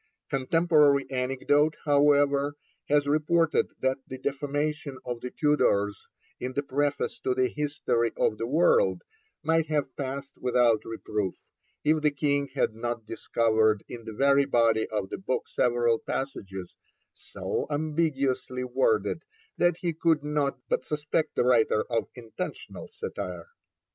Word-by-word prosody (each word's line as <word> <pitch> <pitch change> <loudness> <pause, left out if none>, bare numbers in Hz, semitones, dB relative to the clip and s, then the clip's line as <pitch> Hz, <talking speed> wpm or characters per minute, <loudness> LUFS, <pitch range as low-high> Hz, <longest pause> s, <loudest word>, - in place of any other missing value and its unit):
Contemporary 145 0 +3
anecdote, 135 +4 +1
however, 145 -1 +3 0.3
has 145 0 +3
reported 155 +3 +2
that 130 0 +1
the 130 - -6
defamation 145 +1 -2
of 120 -1 -4
the 125 - -4
Tudors 105 -10 +1 0.3
in 130 +1 -4
the 140 - -1
Preface 145 +1 -1
to 130 - -1
the 130 -1 +2
History 140 -6 -1
of 110 - +1
the 115 - -2
World 175 - +3 0.4
might 160 0 +2
have 145 -4 -1
passed 140 0 -5
without 120 -3 +3
reproof, 105 -3 -3 0.5
if 155 +1 +3
the 150 - +4
King 145 -1 0
had 125 - +1
not 120 0 -4
discovered 110 -1 +1
in 120 -1 -8
the 110 - -6
very 140 +4 +4
body 115 -4 +2
of 105 -3 -3
the - - -4
book 190 -9 -2
several 120 -1 +2
passages 95 -9 -5 0.4
so - - -4
ambiguously 145 -4 -1
worded 440 - +1 0.4
that 175 -1 +3
he 170 -2 -1
could 160 -2 +2
not 150 -2 0
but - - 0
suspect 150 +1 -2
the - - +2
writer 115 -3 +3
of 115 - 0
intentional 115 -3 -7
satire. 90 -2 -6
140 Hz, 135 wpm, -27 LUFS, 120-150 Hz, 0.5 s, the